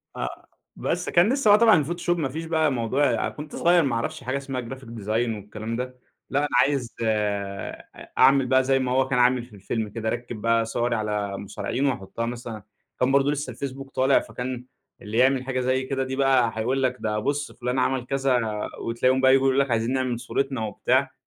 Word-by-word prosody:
آه. 60 - -5 0.3
بس - - -2
كان 190 +9 +4
لسه 275 -7 +2
بقى 205 +1 +7
طبعًا 225 -3 +7
الفوتوشوب 175 +3 -1
ما 140 -5 -1
فيش 160 +4 -5
بقى 160 -2 +2
موضوع 120 0 +1
كنت 150 0 -9
صغير 175 -1 +4
ما 135 -4 0
اعرفش 145 +5 -3
حاجة 130 +3 -1
اسمها 135 -2 -4
graphic 130 +1 -9 0.2
design 105 - -8 0.3
والكلام 105 +2 -6
ده، 125 +1 -5 0.3
لأ 140 - +1
أنا 145 - +1
عايز 135 -4 0
أ 100 -3 -2 0.3
أعمل 135 0 +6
بقى 130 +1 +3
زي 135 0 +2
ما 125 -1 -1
هو 130 0 +2
كان 130 -2 +1
عامل 125 0 +3
في 115 - -20
الفيلم 110 +2 -3
كده، 110 +1 -5
أركِّب 120 -2 -5
بقى 115 0 +2
صوري 120 +1 -1
على 105 -2 -2
مصارعين 105 +7 -3
وأحطها 115 -2 -2
مثلًا 120 -3 -6 0.4
كان 125 +1 +2
برضو 140 +1 +3
لسه 145 -3 -2
الفيسبوك 135 +2 -6
طالع 135 +1 +4
فكان 125 0 -6 0.4
اللي 105 +2 -4
يعمل 130 +1 +4
حاجة 130 -1 -2
زي 130 +1 +1
كده 135 0 -2
دي 130 0 -4
بقى 130 -4 +3
هيقول 130 +4 0
لك 125 -1 +1
ده 105 -1 -1
بُصّ 145 +6 -2
فلان 125 +1 -2
عمل 130 -1 0
كذا 135 -1 +1 0.4
وتلاقيهم 130 +3 +1
بقى 130 0 +6
ييجوا 135 0 +4
يقولوا 135 +1 +3
لك 135 - -6
عايزين 115 +3 +1
نعمل 130 -3 -1
صورتنا 135 -2 -2
وبتاع. 105 - 0
130 Hz, 200 wpm, -25 LUFS, 115-135 Hz, 0.4 s, بقى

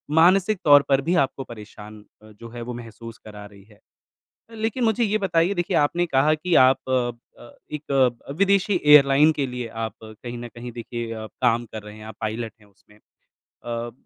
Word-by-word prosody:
मानसिक 185 +5 +4
तौर 145 -1 +8
पर 135 0 +3
भी 170 +6 0
आपको 135 0 -5
परेशान 105 -2 -12 0.2
अ, 110 0 -16
जो 115 +2 -12
है 120 0 -9
वो 120 +1 -6
महसूस 115 -1 -10
करा 105 -1 -10
रही 100 -1 -16
है। 105 0 -22 0.7
लेकिन 225 +2 -2
मुझे 225 +1 +2
ये 215 0 0
बताइए 190 -1 +1
देखिए, 175 0 -1
आपने 170 +4 +1
कहा 145 +1 +2
कि 170 +3 -2
आप 130 +1 +6
अ 125 -2 +1 0.3
अ, 120 - -13 0.2
एक 150 -2 -6 0.4
अ, - - -3
विदेशी 200 -1 +2
एयरलाइन 150 +1 +6
के 145 -3 -2
लिए 125 -2 -6
आप 110 -1 -5
कहीं 120 +2 -9
न 120 0 -7
कहीं 120 +1 -8
देखिए 120 0 -6
अ, 110 -1 -6 0.2
काम 120 +1 +2
कर 110 - -7
रहे 105 0 -11
हैं, 110 - -12
आप 110 - -10
पायलट 110 +1 -4
हैं 105 - -21
उसमें। 100 +1 -25 0.5
अ, 120 0 -7
125 Hz, 195 wpm, -23 LUFS, 110-160 Hz, 0.7 s, तौर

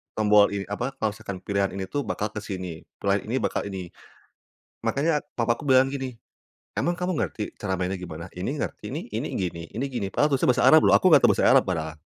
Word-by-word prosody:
tombol 105 -1 +5
ini 100 - -2
apa, 125 +6 -3
kalau 110 -1 -1
misalkan 95 -3 -8
pilihan 100 -1 +1
ini 95 - -3
tuh 140 +9 -3
bakal 105 0 -2
ke 105 - -5
sini, 90 -5 -6 0.2
pilihan 100 +1 -1
ini 120 - -1
bakal - - 0
ini, 95 -3 -6 0.9
makanya 150 +1 +1 0.2
papaku 115 +2 +1
bilang 130 -1 +5
gini, 130 -4 -5 0.6
"Emang 175 - +1
kamu 180 -1 -1
ngerti 105 -7 -3
cara 95 -3 -3
mainnya 95 +1 -1
gimana?" 85 -4 -8
"Ini - - -4
ngerti - - -5
nih, - - -4
ini - - -3
gini 85 -2 -3
ini 120 - -3
gini," 120 -7 -3
padahal 145 -1 +2
tulisannya 130 - +3
Bahasa 125 - +1
Arab 155 - +8
loh, - - +5
aku 185 - +6
nggak 160 - +7
tahu - - +7
Bahasa - - +3
Arab - - +6
padahal. 80 -4 -3
105 Hz, 215 wpm, -25 LUFS, 95-130 Hz, 0.9 s, Arab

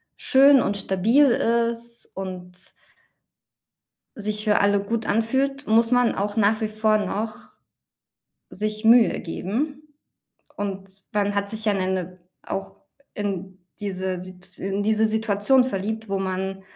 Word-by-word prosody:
schön 275 0 +5
und 200 - -1
stabil 205 +9 +3
ist 235 -1 0
und 180 -1 -6 1.5
sich 210 0 -2
für 210 -1 +3
alle 200 0 +3
gut 220 +2 -3
anfühlt, 270 +5 0
muss 230 +2 +3
man 245 -1 +3
auch 205 +2 -3
nach 215 +1 +3
wie 220 - -2
vor 215 0 +2
noch 215 +2 -3 1.2
sich 215 +1 -3
Mühe 230 +1 +5
geben. 285 - -4 0.6
Und 195 -1 -6
dann 205 -1 0
hat 200 0 0
sich 220 0 0
ja 210 -2 +2
'ne 185 -1 -1
'ne 185 -1 -3 0.2
auch 195 0 -6 0.3
in 195 -2 -4 0.2
diese 190 -2 -3
Sit 185 0 -11
in 195 +1 -2
diese 220 +1 +3
Situation 220 +3 +2
verliebt, 220 -1 -3
wo 195 0 -1
man 190 0 -3
210 Hz, 135 wpm, -23 LUFS, 195-230 Hz, 1.5 s, schön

